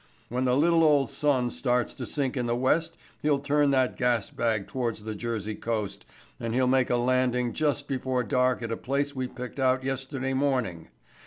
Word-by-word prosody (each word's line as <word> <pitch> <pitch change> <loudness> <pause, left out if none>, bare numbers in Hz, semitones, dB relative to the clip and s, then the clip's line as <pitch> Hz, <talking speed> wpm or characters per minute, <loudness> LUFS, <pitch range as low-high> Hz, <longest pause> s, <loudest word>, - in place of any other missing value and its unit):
When 125 +2 -1
the 125 0 +3
little 165 +2 +4
old 145 -3 +4
sun 135 -3 +1
starts 125 -1 0
to - - -6
sink 140 -3 -1
in 125 -2 -1
the 120 - +1
west 160 +6 +1 0.2
he'll 150 -1 +2
turn 145 +1 +2
that 130 -2 +2
gas 120 -4 0
bag 110 -4 0
towards 120 -5 -3
the 110 0 -4
Jersey 110 -1 -3
coast 110 -2 -4 0.3
and 115 0 -3
he'll 130 0 +3
make 130 0 +3
a - - +2
landing 125 -1 +1
just 145 -2 0
before 130 -2 -1
dark 125 -2 +1
at 115 - -3
a 115 - -2
place 140 +2 -2
we 130 -1 -2
picked 125 +2 -8
out 130 0 +2
yesterday 135 0 -3
morning. 130 - 0
130 Hz, 190 wpm, -27 LUFS, 120-140 Hz, 0.3 s, little